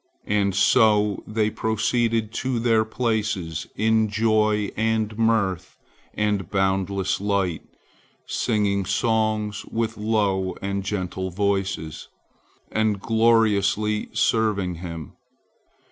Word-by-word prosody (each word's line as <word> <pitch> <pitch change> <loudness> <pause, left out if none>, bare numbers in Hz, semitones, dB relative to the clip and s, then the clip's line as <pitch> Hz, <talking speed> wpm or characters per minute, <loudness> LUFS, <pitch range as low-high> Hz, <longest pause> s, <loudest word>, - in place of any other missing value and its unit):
And 100 -2 +1
so 105 -1 +3
they 110 0 0
proceeded 110 0 0
to 130 -1 -1
their 115 -1 +3
places 110 -8 -2
in 110 0 +2
joy 110 -1 +1
and 110 -1 0
mirth 100 -5 0 0.4
and 105 -4 -1
boundless 95 0 0
light, 100 -5 0 0.6
singing 100 -4 0
songs 110 +1 0
with 115 -1 -3
low 100 -4 0
and 100 0 -3
gentle 95 -2 -3
voices, 95 -4 -2 0.6
and 110 -2 +1
gloriously 105 -2 +2
serving 105 -5 +1
Him. 85 -4 -7
105 Hz, 95 wpm, -23 LUFS, 95-110 Hz, 0.6 s, so